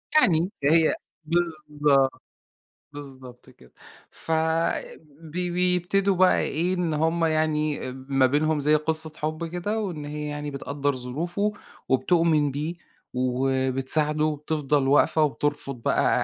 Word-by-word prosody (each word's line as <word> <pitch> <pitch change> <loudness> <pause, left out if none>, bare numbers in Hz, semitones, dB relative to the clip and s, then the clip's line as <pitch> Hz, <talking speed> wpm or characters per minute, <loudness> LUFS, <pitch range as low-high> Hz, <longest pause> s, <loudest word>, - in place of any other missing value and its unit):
يعني 185 - +4
ده 140 - +4
هي 165 -1 +4 0.3
بالضبط، 150 -5 +1 0.7
بالضبط 130 -3 -11
كده. 65 - -20 0.4
ف 165 - -7 0.9
بي 175 +3 -4
بيبتدوا 180 +2 +1
بقى 185 +1 +4
إيه، 170 +5 0
إن 175 -4 -1
هم 165 +2 +1
يعني 155 -3 0
أ - - -6 0.2
ما 135 -1 +4
بينهم 150 +3 +1
زي 150 +2 +3
قصة 160 +1 -1
حب 155 +2 -3
كده، 180 +6 -2
وإن 175 -8 -4
هي 150 0 -5
يعني 145 0 -4
بتقدّر 140 0 -2
ظروفه 170 +11 -2 0.4
وبتؤمن 150 +2 +2
بيه 155 +5 -3 0.4
وبتساعده 130 +4 0
وبتفضل 150 -2 0
واقفة 155 +3 +4
وبترفض 145 -2 -1
بقى - - +2
150 Hz, 120 wpm, -25 LUFS, 140-170 Hz, 0.9 s, يعني